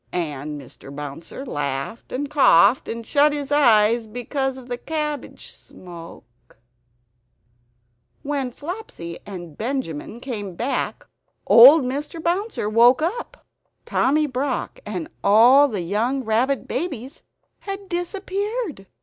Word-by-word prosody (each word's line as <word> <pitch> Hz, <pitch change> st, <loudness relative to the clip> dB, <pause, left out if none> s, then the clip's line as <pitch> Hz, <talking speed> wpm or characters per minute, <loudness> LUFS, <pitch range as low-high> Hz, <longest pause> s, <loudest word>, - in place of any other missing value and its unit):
And 150 Hz, -3 st, -4 dB
Mr. 135 Hz, 0 st, -13 dB
Bouncer 145 Hz, -, -8 dB
laughed 140 Hz, -, -4 dB
and 280 Hz, +3 st, -3 dB
coughed, 265 Hz, -, +5 dB
and 230 Hz, 0 st, -5 dB
shut 290 Hz, +3 st, +3 dB
his 290 Hz, -1 st, -4 dB
eyes 230 Hz, -5 st, +4 dB
because 260 Hz, +4 st, -3 dB
of 255 Hz, -2 st, -11 dB
the 245 Hz, -1 st, -4 dB
cabbage 300 Hz, -2 st, -4 dB
smoke.......... 165 Hz, -11 st, -14 dB, 1.7 s
When 280 Hz, -3 st, -2 dB
Flopsy 285 Hz, -, -7 dB
and 175 Hz, -6 st, -8 dB
Benjamin 230 Hz, -, -4 dB
came 210 Hz, -8 st, -6 dB
back 250 Hz, +9 st, -2 dB, 0.4 s
old 270 Hz, +6 st, +9 dB
Mr. 285 Hz, +6 st, -4 dB
Bouncer 355 Hz, -, -1 dB
woke 240 Hz, +6 st, +5 dB
up. 420 Hz, +9 st, -4 dB, 0.4 s
Tommy 300 Hz, +3 st, +2 dB
Brock 260 Hz, -1 st, -3 dB
and 185 Hz, -6 st, -4 dB, 0.2 s
all 240 Hz, +8 st, +6 dB
the 210 Hz, -8 st, -3 dB
young 225 Hz, +10 st, -1 dB
rabbit 245 Hz, +5 st, 0 dB
babies 275 Hz, -2 st, -4 dB, 0.4 s
had 395 Hz, 0 st, -7 dB
disappeared! 385 Hz, -, -3 dB
250 Hz, 115 wpm, -22 LUFS, 200-295 Hz, 1.7 s, old